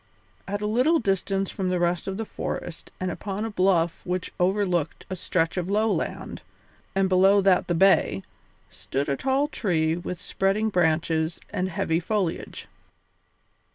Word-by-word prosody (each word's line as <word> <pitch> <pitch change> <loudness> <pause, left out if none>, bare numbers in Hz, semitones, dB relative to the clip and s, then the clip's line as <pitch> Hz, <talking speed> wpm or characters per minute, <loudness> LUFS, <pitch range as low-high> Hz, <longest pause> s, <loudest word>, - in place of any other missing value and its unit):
At 205 +1 -3
a - - 0
little 250 +10 +3
distance 195 - 0
from 190 -2 -2
the 180 - +1
rest 175 0 0
of 195 0 -3
the 225 - -3
forest 175 -4 -5
and 185 -1 -1
upon 200 +4 -4
a 225 - -4
bluff 180 -4 +2
which 180 -1 -3
overlooked 180 -4 0
a - - -1
stretch 165 -1 -1
of 180 0 -2
lowland, 215 +2 -1 0.5
and 195 0 +3
beyond 190 +1 +4
that 190 -2 +4
the 175 - 0
bay, 190 - +4 0.4
stood 140 +2 -4
a 140 - +1
tall 270 - +1
tree 160 - 0
with 175 0 -5
spreading 195 +3 0
branches 160 -3 +1
and 185 +1 -1
heavy 170 -3 0
foliage. 190 -2 -2
185 Hz, 155 wpm, -25 LUFS, 170-200 Hz, 0.5 s, beyond